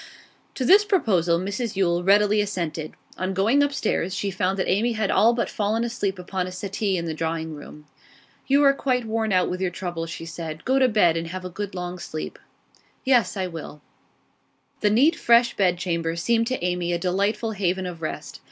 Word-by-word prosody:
To 260 - -2
this 395 +9 +7
proposal 200 - +2
Mrs 200 +5 -3
Yule 175 -2 +1
readily 205 +2 +4
assented. 170 -6 -3 0.3
On 185 +1 -2
going 225 +9 +3
upstairs 255 -10 0
she 200 - -2
found 190 +1 -1
that 185 - -1
Amy 225 +6 +1
had 215 -3 0
all 220 +4 +5
but 235 0 -1
fallen 215 +2 -1
asleep 205 -5 -2
upon 180 0 -3
a - - -6
settee 195 +1 -2
in 170 - -3
the 160 - -3
drawing 160 0 -3
room. 150 0 -11 0.6
'You 280 +2 +4
are 275 -1 +6
quite 255 -3 -1
worn 220 -1 -1
out 185 -1 +3
with 180 +1 -4
your 185 - +1
troubles,' 175 -2 -5
she 165 - -7
said. 160 -1 -7
'Go 265 +1 +3
to 260 - +5
bed, 175 -7 +3
and 165 0 -3
have 185 +2 -6
a 185 - -6
good 200 +1 -5
long 180 0 -5
sleep.' 155 -2 -6 0.7
'Yes, 250 -5 +3
I 190 - -1
will.' 160 -4 -8 1.0
The 210 - +2
neat, 275 +11 +4
fresh 235 -1 +4
bedchamber 175 -3 0
seemed 230 +6 +1
to 255 -6 -2
Amy 175 -1 -1
a - - +1
delightful 200 +5 0
haven 190 -2 -1
of 175 -2 -7
rest. 155 - -6
190 Hz, 195 wpm, -24 LUFS, 175-225 Hz, 1.0 s, this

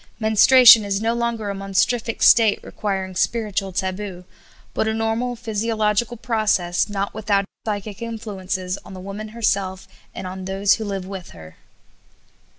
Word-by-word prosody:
Menstruation 225 +1 +7
is 200 -1 -1
no 225 +2 0
longer 235 -3 -2
a - - -3
monstrific 200 +4 -1
state 225 -3 +6
requiring 190 -3 -4
spiritual 200 0 -1
taboo, 185 0 -4 0.5
but - - 0
a 220 - 0
normal 225 +2 -1
physiological 225 0 -1
process, 215 -7 0
not 200 -1 -3
without 205 -2 +1
its 195 - -17 0.2
psychic 205 -1 -4
influences 200 -5 -4
on 190 - -11
the - - -8
woman 200 +3 -7
herself 200 -4 -2 0.3
and 190 - -6
on 185 0 -6
those 195 +1 +2
who 220 +3 -3
live 195 -2 -4
with 190 -2 -8
her. 80 0 -13
205 Hz, 150 wpm, -21 LUFS, 190-225 Hz, 0.5 s, Menstruation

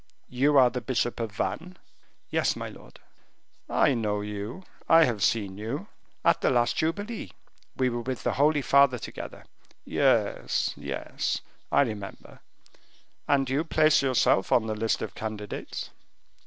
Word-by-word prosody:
You 140 +4 +3
are 125 -2 +6
the 125 - -3
bishop 120 -1 -1
of 115 -2 -3
Vannes?" 105 - -4 0.5
"Yes, - - +1
my - - -5
lord." - - -15 0.7
"I 145 - +3
know 105 -4 -1
you, 105 - -6 0.3
I 165 0 +8
have 115 -8 0
seen 100 -2 0
you." 140 - -4 0.4
"At - - +4
the - - +3
last 120 -2 +2
jubilee, 205 - -3 0.4
we 130 - +2
were 120 0 -3
with 130 +1 -4
the - - 0
Holy 145 0 +3
Father 140 -1 +5
together." 115 - -8 0.4
"Yes, - - +1
yes, - - -3 0.3
I - - +5
remember; 105 -7 -5 0.9
and 135 -2 +2
you 135 +4 0
place 155 -2 +4
yourself 130 -7 +2
on 115 - +4
the 110 - -2
list 110 +1 -1
of - - -5
candidates?" 105 -1 -6
125 Hz, 145 wpm, -27 LUFS, 110-145 Hz, 0.9 s, I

